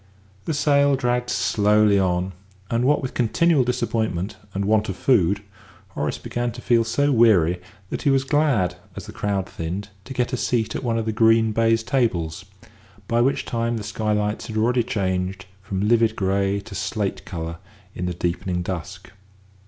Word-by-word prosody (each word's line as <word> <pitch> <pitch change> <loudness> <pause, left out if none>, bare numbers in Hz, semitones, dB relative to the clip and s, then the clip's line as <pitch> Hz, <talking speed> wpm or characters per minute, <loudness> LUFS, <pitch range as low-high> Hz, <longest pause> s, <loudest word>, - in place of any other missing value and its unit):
The 160 - -1
sale 140 -1 +3
dragged 125 -1 0
slowly 105 -1 +3
on, 90 0 0 0.4
and, 120 +1 +1
what 145 +1 +2
with 130 - -4
continual 145 +5 +3
disappointment 110 -6 -1 0.2
and 100 +1 -2
want 105 0 +2
of 95 - -3
food, 100 -6 +2 0.5
Horace - - -3
began 120 0 -3
to 120 - -9
feel 115 -2 +3
so 140 +6 +1
weary 95 - +4 0.3
that - - -3
he 145 - +2
was 135 -1 +3
glad, 135 - +1 0.2
as - - -7
the - - -9
crowd 100 -2 -2
thinned, 90 +5 -5 0.2
to 135 - -7
get 125 +1 -1
a - - +1
seat 115 -2 0
at - - -3
one 115 -2 0
of 115 - -1
the 110 - 0
green 110 0 +4
baize 115 +1 +2
tables, 95 -10 -1 0.6
by 115 +2 +2
which 135 +3 +1
time 115 -1 -1
the 110 - -5
skylights 105 0 -1
had 110 - -5
already 120 +3 +2
changed 95 -3 -2 0.2
from 100 +1 -2
livid 115 -1 +3
grey 100 0 0
to 105 +1 -11
slate 100 -1 -2
colour 85 -1 -5 0.4
in 90 - -3
the 90 - -3
deepening 90 +1 -2
dusk. 90 +1 -6
110 Hz, 175 wpm, -23 LUFS, 95-120 Hz, 0.6 s, weary